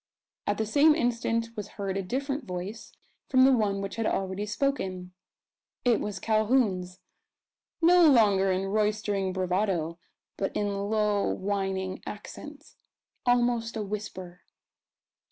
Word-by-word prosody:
At 205 - +1
the 220 - 0
same 295 +7 +5
instant 230 -4 0
was 210 -1 -5
heard 195 -2 -2
a 195 - 0
different 270 +7 -3
voice 185 +4 -6 0.4
from 260 -1 +5
the 270 - +7
one 200 -4 0
which 195 +3 -5
had 225 - 0
already 195 +2 -2
spoken. 190 -7 -2 0.7
It 240 -3 +4
was 205 -2 -4
Calhoun's 215 -5 +1 0.8
no 345 -1 +7
longer 200 -7 +4
in 185 +1 0
roistering 205 -1 0
bravado, 180 -3 -1 0.4
but 195 - -2
in 200 -1 -1
low 210 -2 +1
whining 190 -1 -2
accents, 295 +8 -9 0.5
almost 240 -2 +2
a 215 - -2
whisper. 195 -3 -6
210 Hz, 125 wpm, -28 LUFS, 190-230 Hz, 0.8 s, the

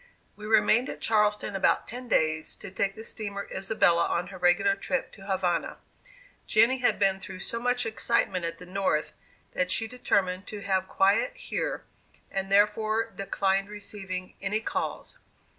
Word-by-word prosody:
We 210 +1 -9
remained 225 +2 +4
at - - -6
Charleston 210 -2 +2
about 195 - +2
ten 250 +2 -6
days, 155 -7 +1
to - - -9
take 195 +1 -1
the 220 - -9
steamer 200 -3 -5
"Isabella" 195 -3 +3
on 180 - -1
her 185 - -10
regular 180 +3 +4
trip 200 +7 -2
to 195 -1 -13
Havana. 185 -3 0 0.7
Jenny 230 +4 +4
had 250 - +2
been 195 -1 +2
through 190 -1 -8
so 230 - -3
much 245 0 +1
excitement 220 -4 0
at 165 0 -3
the 180 - -11
North, 185 -4 -1 0.4
that 180 0 0
she 225 +4 +1
determined 195 -6 0
to 210 -1 -7
have 190 -1 0
quiet 200 - +2
here, - - -3 0.5
and 195 0 -3
therefore 215 +2 +2
declined 195 0 0
receiving 195 -3 -6
any 200 +2 0
calls. 220 - -4
200 Hz, 160 wpm, -28 LUFS, 190-220 Hz, 0.7 s, remained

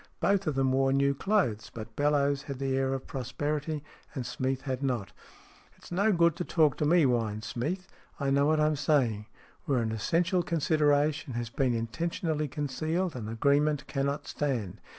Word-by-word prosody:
Both 195 -2 +2
of 150 - 0
them 135 -1 +2
wore 135 0 +2
new 140 +1 +3
clothes, 135 - 0
but 110 -1 -9
Bellowes 145 -1 +2
had 140 - -5
the 135 0 -1
air 135 0 +1
of 135 - -6
prosperity, 145 +4 -3 0.3
and 130 -3 -3
Smeath 130 +1 -2
had 130 -1 -3
not. 125 -7 -1 0.3
" - - -27
It's - - -15
no 200 +5 +3
good 170 -3 +3
to 175 - -2
talk 155 -5 +3
to 150 - 0
me," 170 +1 +5
whined 115 -5 0
Smeath. 175 - -3 0.2
" - - -30
I 140 -1 0
know 140 +1 +3
what 155 0 +3
I'm 155 0 +3
saying. 130 -8 +1 0.4
Where 140 -6 +1
an 115 -2 0
essential 170 - +1
consideration 150 -3 +1
has 120 -1 -4
been 125 -1 +1
intentionally 155 +6 -2
concealed, 155 +5 -2
an 115 -4 -5
agreement 145 +5 +2
cannot 140 0 -2
stand. 125 -11 -2
140 Hz, 180 wpm, -29 LUFS, 130-155 Hz, 0.4 s, me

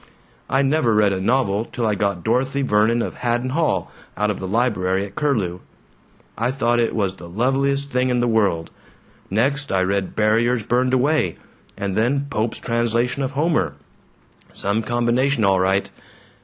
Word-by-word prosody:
"I 135 +1 +2
never 135 -5 +2
read 105 -2 +3
a 95 - -2
novel 110 -1 +1
till 120 -1 -4
I 110 - +2
got 100 -3 -1
'Dorothy 135 +6 0
Vernon 115 0 +2
of - - -4
Haddon 120 +1 -1
Hall' 160 +3 0 0.3
out 105 0 +1
of 105 - -5
the 95 - -4
library 95 -3 0
at 100 - -11
Curlew. 105 - -1 0.8
I 115 +3 0
thought 120 -2 +1
it 115 - 0
was 100 -3 -1
the 85 - -11
loveliest 135 +7 0
thing 125 0 +1
in 125 -1 +1
the 120 - +1
world! 100 -8 +1 0.6
Next 140 +8 0
I 95 -1 +2
read 95 0 -1
'Barriers 115 +2 +2
Burned 125 +3 +1
Away' 130 - +1 0.4
and 100 -1 -3
then 135 +6 +1
Pope's 110 -1 -1
translation 120 +2 0
of 135 +1 -2
Homer. 150 - 0 0.8
Some 100 +3 -1
combination, 120 +1 +1
all 95 -1 +3
right! 95 +2 +1
115 Hz, 165 wpm, -21 LUFS, 100-130 Hz, 0.8 s, read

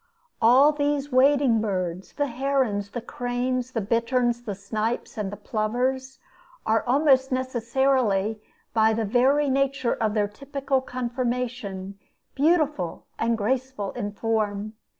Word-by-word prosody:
All 255 +6 +6
these 290 -1 -1
wading 260 -3 +4
birds 185 -3 -3
the 290 - 0
herons, 250 -6 -1
the 240 - -5
cranes, 245 +1 -2
the 225 - -1
bitterns, 235 +3 +1
the 210 -4 -5
snipes, 215 +4 -3
and 205 -3 -3
the 205 - -7
plovers 255 +4 -2 0.5
are 225 0 +2
almost 265 0 +3
necessarily, 240 -4 +1 0.3
by 220 -1 +4
the 225 0 -1
very 265 +7 +3
nature 270 -2 +1
of 220 -1 -1
their 205 -1 +2
typical 275 +4 -2
conformation, 240 -6 -3 0.3
beautiful 295 - +1
and 230 0 +1
graceful 245 -2 -2
in 205 -4 -4
form. 215 -1 -2
245 Hz, 125 wpm, -25 LUFS, 215-265 Hz, 0.5 s, All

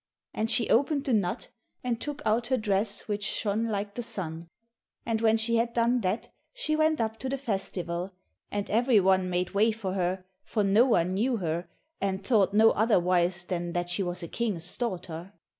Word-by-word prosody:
And 220 +1 -1
she 235 -1 +2
opened 280 +4 +3
the 270 -4 0
nut, 200 -5 0 0.3
and 245 -2 -2
took 295 0 -5
out 225 +2 +1
her 260 0 +2
dress 210 -1 -1
which 205 -1 -2
shone 210 +2 0
like 205 -1 -3
the 240 - -4
sun, 170 -6 -4 0.6
and 225 -1 -1
when 225 0 +4
she 230 +1 +2
had 235 +1 0
done 235 +1 +2
that 190 +4 -1 0.3
she 405 -12 0
went 310 0 +2
up 220 -1 -2
to 260 - -3
the 275 - -1
festival, 190 -7 -3 0.4
and 205 -1 -3
every 235 +1 +4
one 190 -1 +3
made 180 0 -1
way 215 +3 +3
for 210 -4 -4
her, 185 0 -1 0.2
for 215 - -1
no 205 +6 +4
one 180 -6 +2
knew 235 +5 +1
her, 170 -2 -3 0.3
and 195 0 -2
thought 200 -4 +3
no 220 +2 +6
otherwise 180 -4 +2
than 175 -1 -3
that 175 0 -2
she 180 - +1
was 175 -1 -3
a - - -4
king's 180 -5 -2
daughter. 185 -5 -4
205 Hz, 190 wpm, -28 LUFS, 185-230 Hz, 0.6 s, no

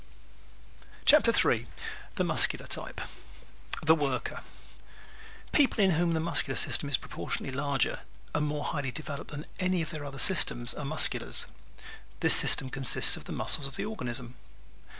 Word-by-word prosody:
_ - - -27
CHAPTER 295 -5 +5
III 120 - +1 0.5
The - - -1
Muscular - - +1
Type - - -4 0.8
"The 160 +1 +4
Worker" 140 -5 -3 1.1
People 260 -7 +2
in 190 - +3
whom 170 0 0
the - - -1
muscular 160 -5 -2
system 145 - +2
is 135 - 0
proportionately 130 - -5
larger 140 -1 -1 0.3
and 150 0 -1
more 145 0 -4
highly 145 -4 -4
developed 145 0 -8
than 145 +1 -8
any 185 -2 -1
of 155 - -7
their 155 -3 -7
other 140 -1 -9
systems 125 -9 +5
are 150 - -8
Musculars. 150 0 +2 0.7
This - - +6
system 130 -1 +5
consists 135 -2 +4
of - - -11
the - - -9
muscles 140 - 0
of 140 - -10
the - - -5
organism. 125 - -7
145 Hz, 150 wpm, -28 LUFS, 135-165 Hz, 1.1 s, This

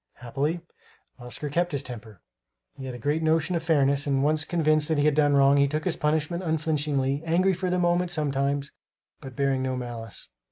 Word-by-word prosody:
Happily 145 +8 -3 0.6
Oscar 125 +4 -6
kept 175 +2 0
his 140 -1 -2
temper. 115 -6 -10 0.5
He 135 - -8
had 130 -1 -6
a - - -6
great 145 +6 -1
notion 160 +2 +1
of 170 - -1
fairness 145 -3 +2
and, 135 -1 +1
once 155 +1 +2
convinced 155 -3 +2
that 160 - 0
he 145 - +2
had 150 - +4
done 145 -1 +3
wrong, 140 0 +5
he 140 0 +4
took 155 +2 -3
his 180 - 0
punishment 155 +3 -1
unflinchingly, 150 -4 0
angry 180 +4 +2
for 185 +1 -2
the 180 - 0
moment, 175 0 +1
sometimes, 140 -3 -1 0.5
but 135 -3 -10
bearing 135 -2 0
no 130 -1 -2
malice. 120 -3 -7
150 Hz, 195 wpm, -26 LUFS, 135-160 Hz, 0.6 s, wrong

